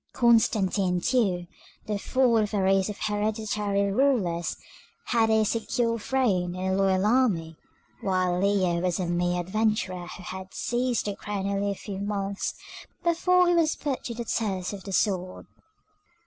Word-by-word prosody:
Constantine 205 -6 +3
too, 190 -5 +1 0.4
the 210 -1 -2
fourth 230 -4 +2
of - - +1
a - - +1
race 195 +1 +3
of 205 - -5
hereditary 210 -1 -1
rulers, 195 -9 +1 0.5
had 225 -1 +2
a 220 0 +4
secure 230 +1 0
throne 200 -8 0
and 190 +1 -1
a - - +1
loyal 190 0 +2
army, 210 -9 +2 0.5
while 185 -2 +1
Leo 190 -4 +2
was 180 0 0
a 185 - -1
mere 175 +1 0
adventurer 185 -2 -1
who 180 - -9
had 190 +1 -8
seized 245 0 -1
the 205 -1 -2
crown 200 -2 -4
only 200 0 0
a 200 - -2
few 195 0 -7
months 200 -1 -3 0.5
before 360 +1 +3
he 350 - +4
was 330 -2 +2
put 280 -3 -3
to 235 - -4
the 235 0 -5
test 195 -5 -2
of 195 -2 -8
the 195 - -6
sword. 185 -2 -1
200 Hz, 160 wpm, -26 LUFS, 185-230 Hz, 0.5 s, a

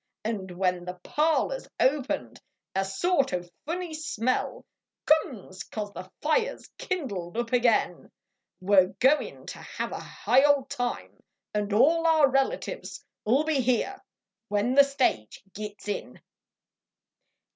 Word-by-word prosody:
Xd 195 -5 -3
when 180 -1 0
the 180 0 -5
parlor 320 +11 +1
s - - -14
opened 275 0 0 0.3
a 195 - +1
sort 270 - +1
o 180 - -3 0.2
funny 345 0 -3
smell 255 -6 -2 0.4
Comes 245 -12 +1
cause 205 -2 -5
the 185 +2 -8
fire 460 +11 +2
s - - -16
kindled 215 - -4
up 240 0 -2
ag 250 0 +3
in, 225 - +1 0.5
We 200 +2 +2
re 185 -1 +7
goin 270 +4 +2
to - - -8
have - - -5
a - - -4
high 265 +2 +2
old 285 -2 +3
time 245 0 -4 0.3
Xd 210 -1 -1
all 330 +5 +4
our 315 -3 +6
relatives 270 - -2 0.2
I - - -2
ll 270 +6 +4
be 310 -3 +1
here 255 - 0 0.5
when 210 +4 +1
the 280 +1 +8
stage 260 - -1
gits 210 0 -7
in. 205 - -4
255 Hz, 145 wpm, -27 LUFS, 205-305 Hz, 0.5 s, the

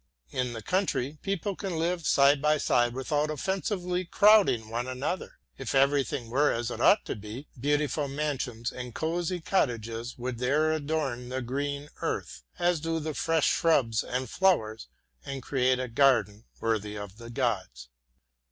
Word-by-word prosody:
In 125 -1 -1
the 115 -2 -7
country, 155 -7 -1
people 195 0 -2
can 190 -4 -4
live 170 0 -1
side 140 0 +5
by 150 0 +3
side 120 -4 +2
without 145 +3 0
offensively 180 +3 -2
crowding 195 - +4
one 120 +2 -2
another. 130 +8 -4 0.2
If 135 -1 -3
everything 135 -3 +2
were 145 +4 +3
as 120 +1 -2
it - - -5
ought 205 - +5
to - - -3
be, 110 +7 -8
beautiful 145 +2 0
mansions 135 -5 -3
and 125 -2 -7
cosy 175 +2 -1
cottages 120 - -1
would 125 -1 -4
there 150 +5 +2
adorn 145 -5 -2
the 130 0 -3
green 140 +3 -3
earth, - - -3 0.2
as 175 -1 +2
do 165 +1 -1
the 155 0 -3
fresh 165 0 +1
shrubs 130 -9 +2
and 125 +1 -3
flowers, 110 - +1 0.4
and 135 -2 -6
create 130 -1 +2
a 130 0 -3
garden 115 -5 +2
worthy 105 -2 -1
of 100 0 -8
the 115 0 -9
gods. 105 - -2
135 Hz, 155 wpm, -28 LUFS, 120-160 Hz, 0.4 s, side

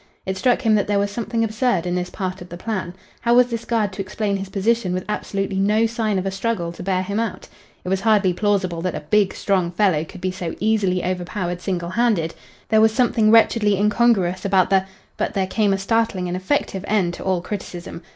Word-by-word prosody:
It 190 - -2
struck 250 +5 +1
him 220 -2 +3
that 205 -2 +2
there 205 0 +1
was 200 0 0
something 230 +1 -2
absurd 220 -4 0
in 175 - -1
this 180 0 -2
part 185 -2 -4
of 175 - -10
the 175 - -8
plan. 185 -3 -4 0.2
How 235 0 +2
was 250 0 +5
this 230 0 -3
guard 215 -4 0
to 195 - -4
explain 200 +1 -2
his 195 0 -6
position 200 -1 0
with 185 - -3
absolutely 195 -2 -2
no 210 +3 +3
sign 225 -3 -1
of 185 - -2
a 195 - -1
struggle 195 -3 -2
to 170 - -10
bear 185 0 0
him 200 +3 -2
out? 230 -1 -3 0.4
It - - -3
was 190 0 0
hardly 205 -4 +3
plausible 190 -4 0
that 185 +1 -2
a - - -4
big, 210 -3 +2
strong 185 -4 0
fellow 175 -4 +2
could 180 +4 -11
be 185 0 -2
so 180 -3 -5
easily 200 -5 +1
overpowered 180 0 -3
single 175 -2 -2
handed; 190 -6 +1 0.4
there 220 0 +4
was 220 0 +5
something 225 -2 +2
wretchedly 220 -2 +4
incongruous 205 -3 +2
about 190 -2 +2
the 190 -1 +3 0.3
but - - -2
there 195 -1 +1
came 205 +2 +1
a 195 - +2
startling 200 -2 0
and 175 - -2
effective 190 0 -1
end 190 -5 +1
to - - -8
all 190 -2 +1
criticism. 175 -3 -7
195 Hz, 220 wpm, -21 LUFS, 185-220 Hz, 0.4 s, was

